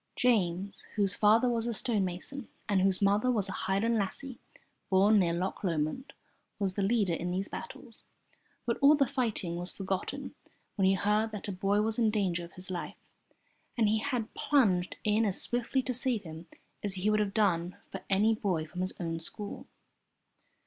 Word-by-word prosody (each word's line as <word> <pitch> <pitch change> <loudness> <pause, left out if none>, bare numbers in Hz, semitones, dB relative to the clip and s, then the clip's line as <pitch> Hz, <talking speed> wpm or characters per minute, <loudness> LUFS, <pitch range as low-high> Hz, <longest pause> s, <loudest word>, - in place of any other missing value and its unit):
James, 195 -5 +1
whose 200 -3 +3
father 220 +4 +4
was 235 -1 0
a 235 - -1
stonemason 210 +4 -2 0.2
and 200 -2 +2
whose 195 +1 +2
mother 205 +5 +3
was 210 -5 +1
a - - -4
Highland 215 +5 0
lassie 245 +6 -4 0.5
born 200 +3 +5
near 175 -3 +2
Loch 180 +5 -3
Lomond, 170 - -2 0.4
was 195 -2 0
the 200 - -2
leader 200 -3 +2
in 175 +2 -2
these 190 +3 -1
battles, 470 - -8 0.6
but 235 -1 -1
all 285 +2 +7
the 280 -2 +3
fighting 230 -10 -1
was 175 +1 -1
forgotten 195 +8 -4 0.4
when 195 -2 +3
he 190 - +4
heard 210 +3 +1
that 210 - -5
a - - -1
boy 200 +2 +1
was 225 +1 0
in 225 -2 +4
danger 190 -5 0
of 170 - -11
his 185 +1 -8
life, 175 - -5 0.8
and 230 - +3
so 210 - +3
he 220 - +2
had 245 -3 -2
plunged 195 -11 +2
in 215 +1 +2
as 200 -3 +1
swiftly 245 +2 0
to 255 - -2
save 245 -3 +1
him 160 0 -9 0.4
as 200 -2 -2
he 195 +3 +1
would 215 - +2
have 205 -1 -1
done 185 -3 +1
for - - -6
any 210 +3 +4
boy 185 -7 -1
from 180 +3 -6
his 185 - -1
own 165 -2 -3
school. 205 +5 -6
205 Hz, 185 wpm, -30 LUFS, 185-225 Hz, 0.8 s, all